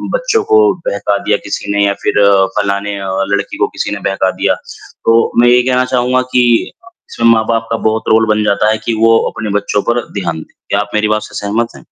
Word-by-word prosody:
बच्चों - - 0
को 430 -1 +3
बहका - - -1
दिया - - +1
किसी - - -5
ने 100 0 +2
या 100 - +1
फिर 105 - +1 0.4
फ़लाने 100 0 -2
अ, 95 -1 -5 0.2
लड़की 100 - -2
को - - +1
किसी - - -4
ने - - -6
बहका 95 -1 0
दिया। - - +2
तो, 115 0 -2
मैं 120 - +4
ये 125 0 +5
कहना 125 0 +1
चाहूँगा 125 0 +1
कि 125 - +4 0.7
इसमें 115 - +1
माँ-बाप 115 0 0
का 115 - +1
बहुत 110 0 -1
रोल 110 0 +4
बन 105 0 +1
जाता 105 +1 +1
है 110 - 0
कि 115 - 0
वो 115 +1 +4
अपने 110 -1 -6
बच्चों 105 0 0
पर 120 +1 +2
ध्यान 85 -5 -3
दें, - - -13 0.2
क्या 100 - +1
आप 105 0 -3
मेरी 105 0 +1
बात 110 0 +1
से - - -12
सहमत 115 +3 0
हैं? - - -12
110 Hz, 220 wpm, -14 LUFS, 100-120 Hz, 0.7 s, ये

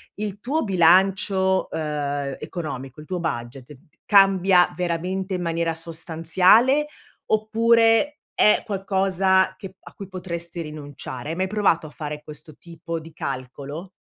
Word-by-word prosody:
il 205 -1 -5
tuo 285 +8 -1
bilancio, 190 +1 +3
uhm, 145 -3 -3
economico, 135 -5 -6
il 150 - -12
tuo 180 -1 -3
budget 130 -2 -5 0.3
cambia 195 -3 +5
veramente 180 +2 -2
in 180 - -2
maniera 165 -1 -1
sostanziale, 170 - +2 0.4
oppure 225 +5 +3
è 210 - +4
qualcosa 190 -2 +1
che 190 -1 -10
a - - -14
cui 195 - -9
potresti 170 -2 -5
rinunciare? 145 -3 -7
Hai - - -3
mai 190 +1 0
provato 195 -6 +1
a - - -11
fare 150 0 -7
questo 150 0 -11
tipo 170 -1 -7
di 160 +1 -13
calcolo? 140 +5 -6
175 Hz, 130 wpm, -23 LUFS, 155-195 Hz, 0.4 s, cambia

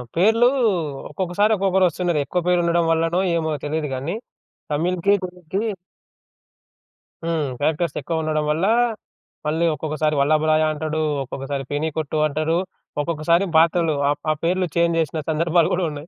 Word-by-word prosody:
పేర్లు 225 +7 +4 0.6
ఒక్కొక్కసారి 190 +6 0
ఒక్కొక్కరొస్తున్నారు. 180 -4 +1
ఎక్కువ 180 +4 -1
పేర్లు 180 -1 +3
ఉండడం 170 0 +2
వల్లనో 165 +2 +1 0.2
ఏమో 160 -1 -1
తెలీదు 155 0 -2
కానీ 140 +8 -3 0.6
తమిళ్‌కి, 180 +5 +1
తెలుగుకి 180 0 -5 1.6
హ్మ్. 160 -4 -1
క్యారెక్టర్స్ 155 +2 0
ఎక్కువుండడం 155 -2 -1
వల్ల 165 +5 0 0.8
మళ్ళీ 160 +3 +1
ఒక్కొక్కసారి 155 0 -1
వల్లభరాయ 155 +2 +3
అంటాడు. 155 +1 -2 0.2
ఒక్కొక్కసారి 135 +1 -5
పెనీ 150 +2 0
కొట్టు 155 0 -2
అంటాడు. 155 +3 0 0.4
ఒక్కొక్కసారి 170 +4 +1
పాత్రలు 165 -1 +3
ఆహ్, 145 - 0
ఆ - - +3
పేర్లు 180 +2 +1
చేంజ్ 170 0 +2
చేసిన 160 0 -2
సందర్భాలు 165 +1 +2
గూడా 180 -1 +1
ఉన్నాయి. 145 +2 -8
165 Hz, 125 wpm, -22 LUFS, 155-175 Hz, 1.6 s, పేర్లు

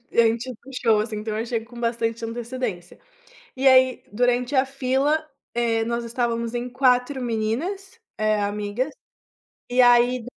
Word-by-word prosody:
em 230 -1 +4
tipo 250 -1 -7 0.2
show, 225 -3 +3
assim, 215 0 -3
então 215 0 -4
eu 220 - -1
achei 230 0 -2
com 235 +1 -13
bastante 230 -1 -1
antecedência. 230 -5 -5 0.6
E 270 +1 +2
aí 260 -1 +5
durante 245 +4 +1
a 260 - +4
fila, 275 +3 0 0.3
eh, 230 -1 +1
nós 235 +1 -2
estávamos 235 -1 -2
em 240 +1 -3
4 255 +1 +2
meninas, 280 - -3 0.2
eh, 215 0 +1
amigas, 205 +6 -2 0.8
e, 250 +1 +4
aí, 245 0 +4
240 Hz, 145 wpm, -23 LUFS, 225-255 Hz, 0.8 s, aí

